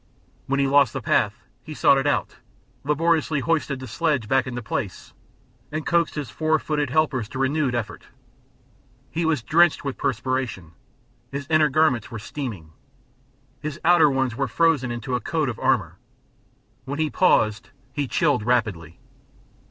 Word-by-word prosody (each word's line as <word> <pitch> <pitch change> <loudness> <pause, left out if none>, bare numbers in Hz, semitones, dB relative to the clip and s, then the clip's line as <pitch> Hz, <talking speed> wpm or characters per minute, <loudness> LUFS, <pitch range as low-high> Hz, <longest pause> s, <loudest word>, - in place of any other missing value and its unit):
When 140 +1 0
he 140 - +3
lost 140 -2 +4
the - - -4
path - - +1 0.2
he 155 - -9
sought 140 - +4
it 135 - -1
out, 145 - -1 0.5
laboriously 155 +1 +1
hoisted 155 -3 0
the 130 - -8
sledge 130 -1 -1
back 135 +2 +2
into 125 -1 -5
place, 105 -3 -5 0.6
and 155 0 -4
coaxed 170 -1 +1
his 145 -6 -5
four 155 0 +1
footed 150 -2 -2
helpers 130 -6 0
to - - -7
renewed 135 -1 0
effort. 120 -3 -5 1.1
He 165 +2 -1
was 155 -7 0
drenched 165 +4 +3
with 140 - -4
perspiration, 125 -8 -2 0.6
his 140 0 -4
inner 155 -1 +4
garments 135 -6 +2
were 115 - -6
steaming, 105 - -6 0.9
his 150 +1 -5
outer 175 -3 +6
ones 130 -3 0
were 135 +1 -1
frozen 150 -1 +2
into 120 +2 -4
a 125 - +1
coat 155 +2 -1
of 120 - -6
armor; - - 0 0.9
when 140 +2 -4
he 155 -1 0
paused 110 - +2 0.2
he 145 -2 -2
chilled 145 -2 +1
rapidly. 105 -9 -1
140 Hz, 155 wpm, -23 LUFS, 120-155 Hz, 1.1 s, outer